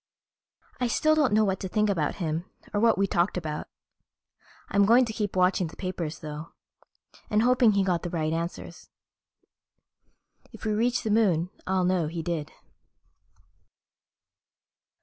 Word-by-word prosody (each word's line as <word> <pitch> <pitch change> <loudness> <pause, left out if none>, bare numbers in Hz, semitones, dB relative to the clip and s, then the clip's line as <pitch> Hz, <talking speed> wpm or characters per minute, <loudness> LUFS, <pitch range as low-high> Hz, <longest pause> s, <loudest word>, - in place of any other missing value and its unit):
I 250 - +1
still 310 +6 +2
don't 300 -4 +2
know 215 +1 +4
what 190 -1 -1
to 190 - -4
think 210 +3 +1
about 165 -8 0
him 165 -1 -3 0.3
or 205 - +1
what 230 +1 +4
we 200 - +3
talked 180 0 0
about. 155 -3 -4 1.0
I'm 200 +1 +3
going 245 +3 +6
to 220 - -5
keep 210 -3 -3
watching 180 -1 +2
the 160 - -12
papers 175 -4 -5
though, 150 +1 -7 0.8
and 210 +1 +2
hoping 245 -3 +4
he 200 -1 +2
got 180 -3 0
the 175 - -4
right 160 -2 -1
answers. 170 +1 -5 1.6
If - - -11
we 215 - +1
reach 235 +3 +1
the 220 - -1
Moon 185 -6 +2 0.2
I'll 185 -1 +1
know 180 -3 +1
he 165 +1 -5
did.... 160 -4 -3
185 Hz, 150 wpm, -27 LUFS, 170-215 Hz, 1.6 s, going